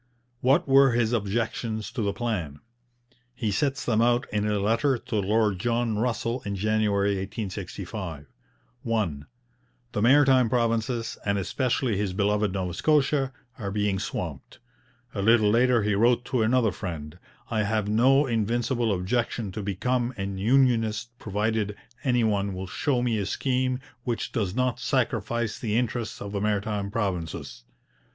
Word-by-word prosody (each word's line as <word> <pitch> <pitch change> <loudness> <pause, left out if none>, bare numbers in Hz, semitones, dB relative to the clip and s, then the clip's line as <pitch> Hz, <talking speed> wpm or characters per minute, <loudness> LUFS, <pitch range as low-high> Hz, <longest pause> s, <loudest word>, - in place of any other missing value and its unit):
What 135 +8 +3
were 135 -1 +6
his 120 -1 +1
objections 110 0 -2
to 120 - -3
the 100 -1 +1
plan? 100 -10 -3 0.8
He 115 -4 -1
sets 135 +6 0
them 110 -2 +2
out 120 +1 +3
in 105 0 +1
a 105 -1 +1
letter 115 +7 +2
to 120 0 -6
Lord 105 -1 +1
John 115 +1 0
Russell 120 +2 -1
in 100 -1 -3
January 105 0 +1
1865. 95 -4 -5 0.6
1. 100 -11 -1 0.7
The 105 - -2
Maritime 130 0 +5
Provinces, 115 -1 0
and 100 0 0
especially 120 +2 0
his 100 -2 -1
beloved 105 +1 +1
Nova 90 -2 -2
Scotia, 140 - +2 0.3
are 100 -3 -3
being 100 -1 0
swamped. - - -5 0.6
A 100 - -2
little 110 0 +4
later 120 0 +3
he 105 0 +1
wrote 120 +4 +3
to 125 -2 0
another 115 0 +3
friend: 85 -4 -6 0.3
'I 110 -1 +1
have 105 0 0
no 130 +7 +4
invincible 120 0 0
objection 105 +2 -1
to 105 - -5
become 120 +6 -1
an 95 -1 -4
unionist 115 -1 +2
provided 105 0 -1 0.3
any 125 -4 +2
one 100 -3 0
will 95 +1 -4
show 125 +6 0
me 115 -3 +1
a 100 - -2
scheme 130 +3 0 0.2
which 120 -2 -2
does 100 -5 -1
not 125 -1 0
sacrifice 115 -3 -1
the 110 -2 -1
interests 120 -3 -2
of 100 - -6
the 100 -1 -2
Maritime 105 -1 -1
Provinces.' 90 - -3
2. - - -37
110 Hz, 150 wpm, -26 LUFS, 100-120 Hz, 0.8 s, were